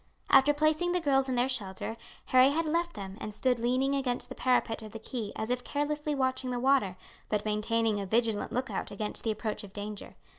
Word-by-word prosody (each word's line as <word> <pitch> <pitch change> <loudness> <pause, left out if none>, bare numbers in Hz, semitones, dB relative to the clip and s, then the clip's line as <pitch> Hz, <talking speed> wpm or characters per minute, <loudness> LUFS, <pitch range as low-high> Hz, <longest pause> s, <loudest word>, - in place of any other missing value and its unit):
After 270 +1 +7
placing 310 +4 +2
the 360 - +2
girls 270 -4 +2
in 255 - 0
their 245 +1 +2
shelter 215 -3 -3 0.3
Harry 255 +1 +6
had 320 +3 0
left 340 +2 0
them 195 0 -7
and 215 -1 -5
stood 250 +1 +1
leaning 255 +4 +1
against 260 -3 0
the - - -5
parapet 245 -3 +1
of 215 -1 -10
the 225 - -6
quay 220 -2 -5
as 220 +2 -3
if 250 0 0
carelessly 295 +1 -1
watching 260 -1 0
the 245 -1 -1
water, 255 -8 +2 0.3
but 210 -1 0
maintaining 215 0 +1
a 200 - -4
vigilant 225 0 +1
look 260 +1 -2
out - - -3
against 210 +1 -4
the 225 - 0
approach 215 0 -2
of 195 -1 -11
danger. 205 0 -6
245 Hz, 215 wpm, -30 LUFS, 215-275 Hz, 0.3 s, After